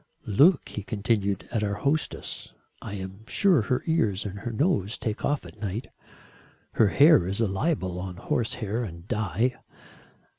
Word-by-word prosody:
"Look," 145 - +4
he 105 - -5
continued, 100 -1 -1
"at 115 - 0
our 100 -1 0
hostess. 140 +9 -2 0.3
I 100 - -6
am 95 +2 -7
sure 185 - +3
her 125 +4 -1
ears 110 - +1
and 100 0 -5
her 120 - -4
nose 115 - 0
take 110 -2 -3
off 145 0 0
at 110 - -13
night. 105 +4 -4 0.8
Her 110 - +4
hair 140 - +6
is 95 +3 -1
a 115 - +3
libel 95 - -1
on 90 -1 -6
horsehair 115 +1 -1
and 85 -4 -8
dye." 110 +4 0
110 Hz, 155 wpm, -26 LUFS, 100-125 Hz, 0.8 s, hair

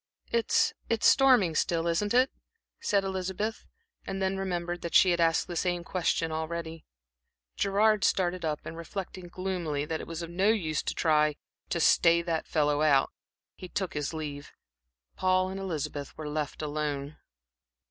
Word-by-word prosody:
"It 235 -1 +2 0.2
it's 230 -1 +1
storming 250 - +5
still, 165 +1 0
isn't 205 +7 0
it?" 255 +2 +4 0.5
said 200 -1 +1
Elizabeth, 190 +3 -3 0.4
and 195 - -4
then 190 0 0
remembered 175 -2 -3
that 170 - -4
she 185 - +7
had 175 - +1
asked 165 0 +3
the 175 - -6
same 175 0 -1
question 170 -2 0
already. 160 0 -4 0.7
Gerard 210 +1 +2
started 180 -1 +1
up 155 -2 -2
and - - -6
reflecting 180 +2 -6
gloomily 175 -5 -3
that 160 +1 -3
it - - -9
was 165 0 -5
of 170 - -7
no 190 +4 +2
use 165 -9 +1
to - - -3
try 150 -2 +3 0.3
to 170 - -1
"stay 170 +1 +4
that 165 -2 -2
fellow 150 -1 +1
out," 140 -3 +4 0.4
he 185 - -10
took 190 -2 -3
his 150 -1 -2
leave. 145 -3 -6 0.7
Paul 185 0 +2
and 190 +1 -5
Elizabeth 150 -6 -4
were 155 - -5
left 150 0 -3
alone. 145 -1 -3
170 Hz, 160 wpm, -29 LUFS, 155-190 Hz, 0.7 s, she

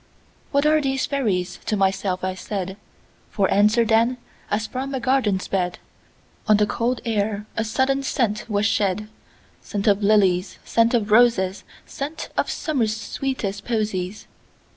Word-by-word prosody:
"What 280 0 +2
are 310 0 +4
these 270 -1 0
fairies?" 190 -10 -1
to 215 - +1
myself 190 -1 0
I 185 0 -1
said; 190 0 -4 0.5
For 195 -3 +1
answer, 215 +3 +4
then, 230 +3 +3 0.3
as 210 +2 0
from 265 +4 -4
a - - -1
garden's 235 -7 +1
bed, 180 -2 -1 0.7
On 215 -1 +6
the 210 - +3
cold 240 +4 -1
air 210 -2 -1
a 225 - 0
sudden 265 +5 +1
scent 235 -6 -1
was 205 -1 +1
shed,—Scent 210 0 -3
of 205 -1 +3
lilies, 195 -3 +3
scent 230 +1 +3
of 215 -2 0
roses, 215 -5 +4 0.2
Scent 295 +3 -6
of - - 0
Summer's 230 -9 -1
sweetest 205 -4 -3
posies. 210 -4 -2
215 Hz, 140 wpm, -23 LUFS, 200-245 Hz, 0.7 s, On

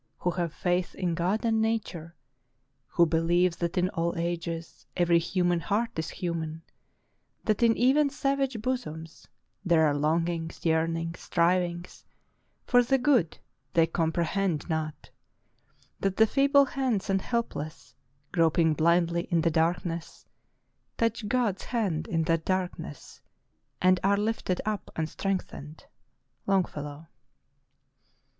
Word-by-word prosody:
Who 180 - -1
have 170 -2 -2
faith 180 +2 -1
in 180 -2 -1
God 185 +7 0
and 225 -1 +2
Nature, 195 -7 -2 0.7
Who 170 - +3
believe, 170 +2 +2
that 170 0 -2
in 180 +1 +2
all 170 +1 -2
ages 170 -1 -4
Every 170 -1 +4
human 175 0 +1
heart 215 +8 -1
is 160 - -3
human, 165 -3 -4 0.8
That 215 0 0
in 230 -1 +4
even 280 +4 +4
savage 275 -3 -1
bosoms 165 -11 -4 0.4
There 170 -4 +4
are 150 - +2
longings, 165 +3 -1
yearnings, 165 +1 0
strivings 175 0 0 0.6
For 245 -1 +5
the 270 +3 +2
good 250 - +2 0.4
they 165 -1 +6
comprehend 165 +1 -1
not, 160 -2 -4 0.9
That 195 -1 -1
the 220 - +7
feeble 280 +3 +4
hands 260 -7 -1
and 195 -1 +1
helpless, 165 -11 -4 0.4
Groping 165 -1 +3
blindly 170 +2 +2
in 170 -1 +2
the 165 0 +2
darkness, 165 +1 -1 0.7
Touch 230 -1 0
God's 235 -5 0
hand 190 -10 -1
in 165 -1 0
that 165 0 +1
darkness; 180 - -4 0.3
— - - -47
And 185 0 +5
are 200 +1 +3
lifted 210 -3 -1
up 215 -1 -3
and 160 -1 -1
strengthened." 160 -5 -4 0.3
— - - -44
Longfellow. 155 -6 -1
175 Hz, 125 wpm, -28 LUFS, 165-210 Hz, 0.9 s, the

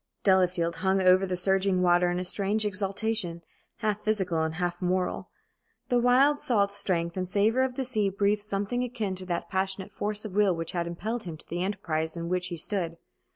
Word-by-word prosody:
Delafield 180 -3 +2
hung 190 +2 +1
over 185 +1 +5
the 180 - -1
surging 190 0 +2
water 175 0 +4
in 175 - -1
a 180 - -2
strange 200 +3 +1
exaltation, 195 -3 -1 0.4
half 210 -1 -1
physical, 180 -7 0
half 175 +2 -3
moral. 180 0 -1 0.6
The 245 - +3
wild 265 +4 +4
salt 200 -5 +2
strength 170 -4 -1
and 185 -1 -2
savor 210 +6 +2
of 260 -1 0
the 265 - -2
sea 215 -5 0
breathed 200 +2 +1
something 205 +4 -2
akin 230 -6 -3
to 185 0 -6
that 175 -2 -2
passionate 190 0 -2
force 210 +1 -3
of 205 - -6
will 200 -3 +3
which 165 0 -3
had 170 -1 -2
impelled 215 +7 -4
him 165 -3 -6
to - - -9
the 175 +2 -2
enterprise 170 -5 -2
in 170 0 -4
which 180 0 0
he 175 -2 -5
stood. 170 -1 -1
190 Hz, 195 wpm, -28 LUFS, 175-210 Hz, 0.6 s, over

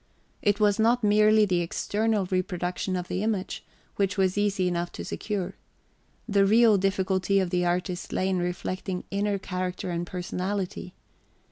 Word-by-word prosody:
It 205 -1 +2
was 210 0 +3
not 235 +2 +3
merely 215 +1 +5
the 180 -3 +1
external 210 +4 0
reproduction 185 0 -2
of 180 -1 -3
the 185 - -2
image, 210 -3 -2 0.3
which 200 0 0
was 190 -1 +2
easy 205 -3 +1
enough 175 -1 -2
to - - -6
secure. 195 -3 -3 0.7
The 200 -3 +3
real 215 0 +5
difficulty 190 0 +1
of 185 -2 -1
the 180 -1 +1
artist 180 +1 -2
lay 185 - 0
in 190 -1 +1
reflecting 180 +1 -3
inner 200 0 0
character 185 -1 -4
and 170 0 -3
personality. 185 +1 -4
190 Hz, 150 wpm, -27 LUFS, 180-205 Hz, 0.7 s, merely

